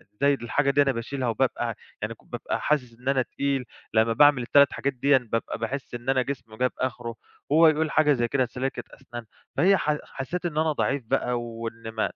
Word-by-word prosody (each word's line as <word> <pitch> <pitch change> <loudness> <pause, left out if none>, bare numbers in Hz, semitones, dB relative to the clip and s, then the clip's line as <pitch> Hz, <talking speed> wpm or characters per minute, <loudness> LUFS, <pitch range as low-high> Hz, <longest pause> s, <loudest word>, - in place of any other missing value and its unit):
إزاي 140 +4 +3
الحاجة 140 +2 0
دي 145 +1 +4
أنا 140 - +3
باشيلها 130 +2 -3
وبابقى 120 -1 0 0.3
يعني - - -3
بابقى - - -4
حاسِس 125 -6 0
إن 130 +2 -3
أنا 135 -1 +3
تقيل، 135 0 -2 0.3
لمّا 110 +1 +3
باعمل 145 +1 +5
ال3 140 +3 +4
حاجات 140 0 -1
ديًا، 135 +2 +4
بابقى 115 - -2
باحِس 130 +3 -4
إن 120 +2 -5
أنا 130 -1 +3
جسمي 120 -5 -6
جاب 125 +1 +1
آخره، 120 -2 -3 0.3
وهو 160 +3 +6
يقول 155 0 +2
حاجة 150 -2 +4
زي 120 -3 0
كده 130 +1 +1
سلّاكة 130 +2 -4
أسنان. 120 -3 -9 0.3
فهي 195 +2 +5
ح 150 -2 0
حسّيت 175 +7 -5
إن 160 -3 -3
أنا 155 0 +2
ضعيف 140 -2 -1
بقى 120 +2 0
وإن 115 -1 -6
ما 110 -1 -1
130 Hz, 195 wpm, -26 LUFS, 120-140 Hz, 0.3 s, وهو